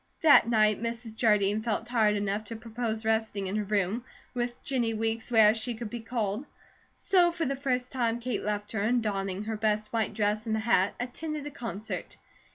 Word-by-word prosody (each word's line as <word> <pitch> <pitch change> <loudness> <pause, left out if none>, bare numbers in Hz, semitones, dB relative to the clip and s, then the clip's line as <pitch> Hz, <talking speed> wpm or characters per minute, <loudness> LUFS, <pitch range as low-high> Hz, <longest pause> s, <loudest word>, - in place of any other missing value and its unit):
That 290 -7 +7
night 215 -2 +3
Mrs. 230 -1 -4
Jardine 210 -2 +3
felt 220 0 -1
tired 225 -4 +2
enough 205 +1 -1
to 230 - -6
propose 225 -1 -4
resting 220 -3 0
in 190 +2 -3
her 215 - 0
room, 205 +2 0 0.3
with 240 -1 -2
Jennie 240 -4 0
Weeks 225 +1 -2
where 220 -3 +6
she 235 +1 -3
could 225 -1 -6
be 240 - -4
called; 225 +2 -2 0.5
so 355 -3 +3
for 335 -1 -2
the 275 0 -1
first 255 -2 -1
time 235 -3 0
Kate 240 -2 -2
left 210 0 -2
her, 220 - -1
and, 235 +3 +2
donning 195 -2 -2
her 220 +1 -3
best 215 0 0
white 225 -1 0
dress 210 +1 0
and 220 - +1
the - - 0
hat, 210 -4 +2
attended 295 +4 -4
a 295 - -5
concert. 225 -6 -6
225 Hz, 195 wpm, -29 LUFS, 210-240 Hz, 0.5 s, That